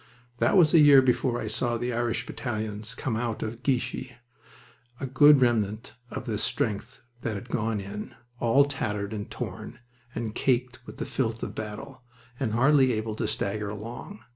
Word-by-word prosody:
That - - +3
was 160 -4 +5
a 165 - +8
year 145 -2 +9
before 125 -1 +1
I - - -4
saw 120 +2 -1
the 120 +1 -2
Irish 120 0 -1
battalions 110 -1 -4
come 120 - -2
out 115 -1 -2
of 115 +2 -5
Guichy, 130 0 -1 0.9
a - - -3
poor 145 +3 +7
remnant 115 -5 +1 0.2
of 125 - -6
the 110 -4 -2
strength 105 -2 -2 0.2
that 115 -2 -2
had 105 +5 -7
gone 110 -2 -1
in, 100 +2 -7 0.2
all 125 +4 +4
tattered 105 -7 -3
and 105 -1 -5
torn, 120 - -6 0.4
and 110 -2 -3
caked 125 0 0
with - - -10
the - - -3
filth 115 -3 -2
of - - -4
battle, 130 +5 -7 0.4
and 120 -6 -1
hardly 130 +1 +4
able 110 0 -2
to - - -2
stagger 105 +1 -2
along. 115 - -8
115 Hz, 170 wpm, -27 LUFS, 110-130 Hz, 0.9 s, year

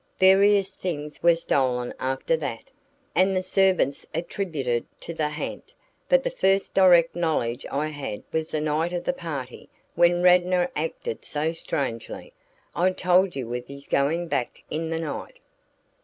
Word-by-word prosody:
"Various 195 +1 +5
things 150 -6 -5
were 170 0 +5
stolen 130 -6 0
after 130 +5 0
that, 145 - -6 0.4
and 190 +1 +3
the 185 - 0
servants 185 -6 +2
attributed 155 - -2
it - - -40
to 170 - -6
the 155 -2 -1
ha'nt, 150 - -6 0.4
but - - +4
the - - -1
first 195 - +1
direct 175 -4 +5
knowledge 155 -9 -1
I 150 +3 -1
had 140 -8 -6
was 160 0 -1
the 155 - -2
night 155 +3 0
of 175 - -2
the 270 - 0
party 145 - -7 0.2
when 175 0 +3
Radnor 180 0 +4
acted 150 -7 -4
so 155 +2 -1
strangely. 140 -7 -4 0.4
I 180 +2 +3
told 180 0 +2
you 125 -3 -4
of 125 0 -4
his 140 0 -10
going 160 +5 +1
back 125 -6 -3
in 160 +1 -2
the 165 0 -2
night." 165 - -5
165 Hz, 155 wpm, -25 LUFS, 140-185 Hz, 0.4 s, Various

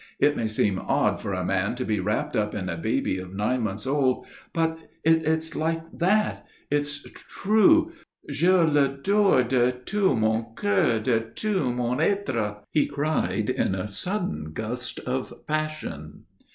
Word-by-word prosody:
It 145 +1 +3
may 115 - -1
seem 105 -3 +1
odd - - +1
for 100 - -4
a 90 -1 -2
man 95 +4 0
to 125 - -3
be 105 -2 0
wrapped 105 +3 -1
up 105 -1 0
in 95 -3 -3
a 85 - -2
baby 85 +2 -1
of 95 +1 -8
nine 115 +5 0
months 105 -1 -3
old 135 -2 +1 0.3
but 160 -1 -2
it's 160 0 +2
like 165 +1 -1
that. 210 +5 +1 0.3
It's 145 0 -1
true. 220 +11 +3 0.4
Je 150 +5 +1
l'adore 145 +3 +3
de 125 0 +2
tout 140 - 0
mon 110 +1 +1
coeur, 100 +3 +2
de 115 0 +2
tout 140 - -1
mon 125 +2 -1
être," 115 - 0
he 150 - +2
cried, 145 +2 -1
in 95 - 0
a 95 +1 -3
sudden 100 - -2
gust 120 +5 -3
of 130 +1 -4
passion. 155 - -4
130 Hz, 150 wpm, -25 LUFS, 105-160 Hz, 0.4 s, It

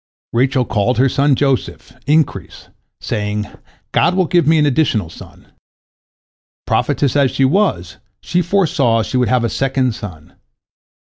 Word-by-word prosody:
" - - -55
Rachel 130 +1 +1
called 110 +3 0
her 130 +3 +4
son 140 +1 +2
Joseph, 135 -1 -2
"increase," 155 0 -1 0.3
saying, 105 0 -3 0.5
"God 180 - +2
will 185 -1 +2
give 175 0 +1
me 160 +1 +4
an 150 - +3
additional 125 - 0
son." - - -15 1.1
Prophetess 140 -2 0
as 140 -2 +3
she 135 - +1
was, 130 - 0 0.2
she 180 - -1
foresaw 160 - +1
she 130 - -3
would 125 -1 +1
have 125 -2 +1
a - - +1
second 130 +1 -1
son. 90 -8 -10
130 Hz, 145 wpm, -17 LUFS, 115-150 Hz, 1.1 s, her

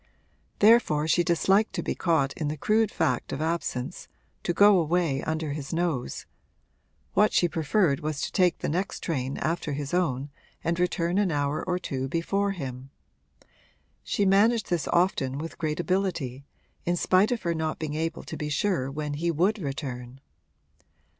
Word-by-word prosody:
Therefore 205 -9 +4
she 175 +2 +3
disliked 190 +5 +2
to - - -2
be - - -1
caught 160 -6 +1
in 155 - -3
the 150 +1 -3
crude 215 +6 +2
fact 145 - -1
of - - -3
absence 160 -2 -3 0.3
to - - -1
go 200 +2 +6
away 165 -4 +1
under 160 -1 -2
his 140 -1 -5
nose; 165 -7 -2 0.9
what 210 +1 +4
she 175 - +4
preferred 160 -1 +1
was 155 -2 -3
to - - -2
take 180 -3 +3
the - - -3
next 185 +6 -2
train 135 -5 -2
after 160 -2 -2
his 145 +2 -4
own 140 -6 0 0.3
and 170 +1 0
return 175 +1 +1
an 200 -4 +2
hour 145 0 -1
or 180 -1 -1
two 135 -6 -3
before 195 +7 0
him. 135 -8 -6 1.1
She 205 - 0
managed 205 +2 +3
this 170 -4 0
often 155 -7 +1
with 165 +3 -6
great 155 -1 -2
ability, 175 -8 -1 0.4
in 175 - 0
spite 185 +4 +3
of 240 - -2
her 170 - 0
not 160 -1 -2
being 155 -2 -4
able 160 +1 -3
to - - -7
be 150 - -4
sure 150 -4 0
when 150 +1 -4
he 165 +4 -1
would 180 +7 +1
return. 135 -4 -5
165 Hz, 165 wpm, -27 LUFS, 145-180 Hz, 1.1 s, go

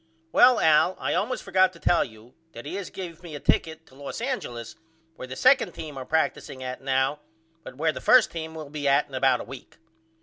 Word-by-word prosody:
Well 250 -2 +6
Al 160 +4 +4
I - - -1
allmost 250 +4 -1
forgot 185 0 +3
to 170 - -15
tell 175 - +3
you 110 +1 -14 0.2
that 115 - -10
he 145 - -6
has 195 -1 -5
gave 170 -4 -8
me 170 -4 -9
a - - -6
ticket 160 +2 0
to - - -22
Los 140 +1 -7
Angeles 125 - -4 0.4
where 130 - -8
the 130 - -7
2d 255 - +3
team 155 -3 -7
are 130 -1 -6
practicing 140 -3 -1
at 130 0 -6
now 135 +2 0 0.4
but - - -11
where 160 +2 +1
the - - -7
1st 255 -3 +5
team 160 -1 -6
will 155 -3 -8
be 145 -2 -3
at 140 0 +3
in 140 - -20
about 130 -1 +2
a - - -6
week. 135 +1 -12
150 Hz, 225 wpm, -25 LUFS, 130-175 Hz, 0.4 s, Well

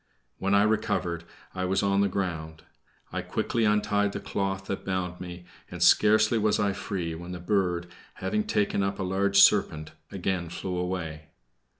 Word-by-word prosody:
When 100 +1 +2
I 100 - +5
recovered, 105 -6 0 0.3
I 95 0 -2
was 95 +2 +1
on 100 0 +2
the 100 - +3
ground. 80 -5 -4 0.5
I - - -1
quickly 115 -1 -1
untied 105 -1 +2
the - - -3
cloth 95 -1 -3
that 95 - -4
bound 90 -2 -3
me, 90 0 -8 0.2
and - - -2
scarcely 110 +2 +5
was 105 0 +2
I 100 -1 +1
free 90 -5 -4
when 85 +2 -7
the 90 - -6
bird, 90 -2 0 0.3
having 105 +3 -1
taken 100 -1 +1
up 100 0 -1
a 95 - -3
large 100 +1 +2
serpent, 80 -6 +4 0.2
again 95 -3 -2
flew 90 +2 -4
away. 85 -4 -4
95 Hz, 170 wpm, -27 LUFS, 90-100 Hz, 0.5 s, I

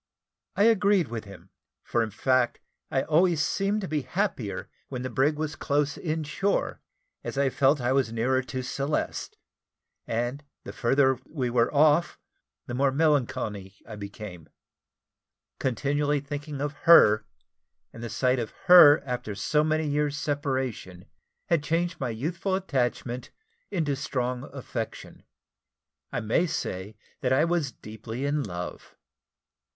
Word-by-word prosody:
I 200 - +3
agreed 200 - +4
with 115 -2 -5
him, 95 -2 -13 0.3
for 120 - 0
in 110 - -1
fact 125 +3 +1 0.3
I 135 - +1
always 165 +1 +3
seemed 200 +2 0
to 190 - -4
be 155 -3 -1
happier 155 - -2 0.2
when 125 -2 -4
the 130 - -4
brig 135 +5 +2
was 155 -1 -3
close 145 0 0
in 160 -1 -2
shore, 190 +7 -1 0.4
as - - -5
I 140 -1 +2
felt 140 +3 +3
as - - -8
if 120 - -1
I - - +2
was 130 -4 +2
nearer 125 +3 +1
to 130 0 -5
Celeste; 140 +3 -3 0.7
and 120 +5 -2 0.2
the - - -8
further 130 +1 +2
we 130 -6 -2
were 120 -1 +2
off, 150 +3 +3 0.5
the - - -6
more 135 +2 +2
melancholy 120 -10 0
I 110 - -7
became. 100 -4 -9 1.1
Continually 145 +3 0
thinking 145 0 -6
of 145 0 -2 0.2
her, 110 -10 +7 0.7
and 115 - -10
the 120 - -5
sight 130 +1 +1
of 115 - -3 0.2
her 165 -5 +9
after 125 -5 -4
so 150 +8 +1
many 155 0 0
years' 145 0 0
separation, 130 -12 -3 0.4
had 170 -3 +2
changed 170 +3 -1
my 130 - -2
youthful 170 - -2
attachment 125 -8 -2 0.4
into 155 -6 0
strong 125 -2 -2
affection. 125 -4 -6 0.9
I - - -2
may 115 +11 +1
say 100 - -4 0.2
that 125 - -1
I 135 +5 +4
was 170 -5 0
deeply 110 +4 -7
in 145 +1 0
love. 90 -7 -7
135 Hz, 145 wpm, -27 LUFS, 120-150 Hz, 1.1 s, her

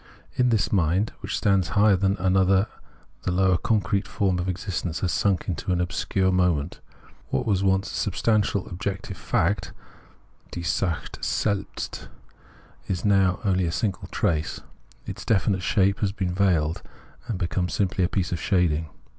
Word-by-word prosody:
In 125 0 +2
that 110 -5 +1
mind 95 +3 +2
which - - -3
stands 95 -4 +2
higher 105 -1 +6
than 95 +1 +1
another 95 +1 +3 0.6
the 95 - -1
lower 95 0 +3
concrete 100 +1 0
form 95 -3 0
of 90 +1 -2
existence 90 -2 -3
has 90 - 0
sunk 95 -4 +1
into 90 +1 -2
an 90 - +1
obscure 95 +2 0
moment; 90 -4 +1 0.5
what 65 - -1
was 100 -3 +1
once 95 0 +1
substantial 105 0 0
objective 95 +2 -4
fact 95 +3 0 0.8
{die 85 - -6
Sache 85 +1 -2
selhst) 100 -2 -2 0.8
is 95 +1 -2
now 95 -3 +3
only 95 -2 +2
a - - -1
single 95 +1 -2
trace: 80 -2 -1 0.4
its - - -6
definite 95 -3 +1
shape 100 +1 +2
has 100 -3 +1
been 95 -3 -2
veiled, 90 -3 +1 0.5
and 115 -5 -2
become 90 +1 -1
simply 95 -1 0
a 90 - +2
piece 95 -3 -1
of 90 - -2
shading. 80 -5 +1
95 Hz, 150 wpm, -25 LUFS, 90-100 Hz, 0.8 s, higher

